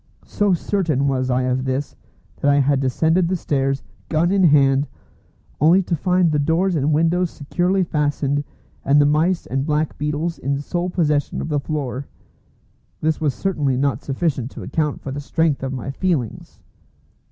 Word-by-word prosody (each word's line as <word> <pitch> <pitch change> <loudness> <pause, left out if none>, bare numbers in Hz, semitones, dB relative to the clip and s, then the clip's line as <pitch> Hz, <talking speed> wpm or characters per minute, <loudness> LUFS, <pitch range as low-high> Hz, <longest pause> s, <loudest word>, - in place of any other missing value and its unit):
So 205 -3 +1
certain 160 -7 0
was 130 -1 0
I 130 0 +1
of 130 0 0
this, 130 +2 -3 0.4
that 145 - +1
I 140 - +5
had 140 0 +3
descended 160 +7 +2
the 185 - 0
stairs, 135 -5 -1 0.3
gun 165 +3 +2
in 195 -1 +3
hand, 140 -2 +4 0.7
only 170 +6 +5
to 175 - -1
find 180 +1 +2
the 150 - +1
doors 170 +5 +1
and 150 0 +1
windows 165 +3 +2
securely 180 +7 0
fastened, 145 -3 0 0.4
and 140 +2 +4
the 145 - +5
mice 160 +5 +2
and 135 +1 -2
black 150 +1 -1
beetles 150 +3 -2
in 140 +2 -1
sole 175 +5 -2
possession 150 -5 0
of - - -4
the 150 -1 +1
floor. 140 -2 -4 0.9
This 155 0 0
was 145 -4 0
certainly 150 -9 0
not 135 -3 0
sufficient 135 -3 -2
to - - -9
account 150 -3 -2
for 135 - -6
the 145 +2 -4
strength 160 0 0
of 135 0 -3
my 130 0 -4
feelings. 145 - -3
150 Hz, 170 wpm, -21 LUFS, 135-170 Hz, 0.9 s, I